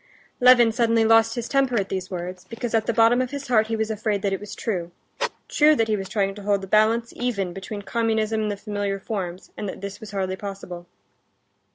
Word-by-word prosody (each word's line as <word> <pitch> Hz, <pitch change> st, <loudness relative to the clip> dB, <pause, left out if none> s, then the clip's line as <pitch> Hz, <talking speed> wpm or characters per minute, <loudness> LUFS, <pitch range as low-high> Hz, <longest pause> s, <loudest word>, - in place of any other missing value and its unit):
Levin 245 Hz, -2 st, +7 dB
suddenly 230 Hz, -1 st, +2 dB
lost 225 Hz, 0 st, +5 dB
his 240 Hz, -1 st, -3 dB
temper 270 Hz, -4 st, +2 dB
at 195 Hz, -, -3 dB
these 185 Hz, -1 st, -3 dB
words, 180 Hz, 0 st, -6 dB
because 230 Hz, 0 st, -5 dB
at 220 Hz, -1 st, +1 dB
the -, -, +3 dB
bottom 230 Hz, +2 st, +4 dB
of 255 Hz, -, -2 dB
his 280 Hz, -1 st, -6 dB
heart 220 Hz, -3 st, +4 dB
he 225 Hz, -, -1 dB
was 220 Hz, 0 st, -1 dB
afraid 210 Hz, -2 st, -1 dB
that 200 Hz, -1 st, +1 dB
it 195 Hz, -, -2 dB
was 205 Hz, -, -8 dB
true—true 295 Hz, -, 0 dB
that 225 Hz, -5 st, +1 dB
he 215 Hz, -, +1 dB
was 195 Hz, -2 st, -5 dB
trying 195 Hz, -1 st, 0 dB
to 205 Hz, -, -10 dB
hold 200 Hz, -1 st, +1 dB
the -, -, -6 dB
balance 220 Hz, +3 st, +2 dB
even 200 Hz, -8 st, -2 dB
between 200 Hz, +2 st, -7 dB
communism 220 Hz, -1 st, 0 dB
and 210 Hz, -1 st, -1 dB
the 200 Hz, -, -4 dB
familiar 205 Hz, -1 st, -3 dB
forms, 190 Hz, -4 st, -5 dB
and 205 Hz, -, -4 dB
that -, -, -8 dB
this 200 Hz, 0 st, -6 dB
was 220 Hz, -, -9 dB
hardly 190 Hz, -2 st, -2 dB
possible. 190 Hz, -3 st, -8 dB
215 Hz, 220 wpm, -24 LUFS, 195-230 Hz, -, Levin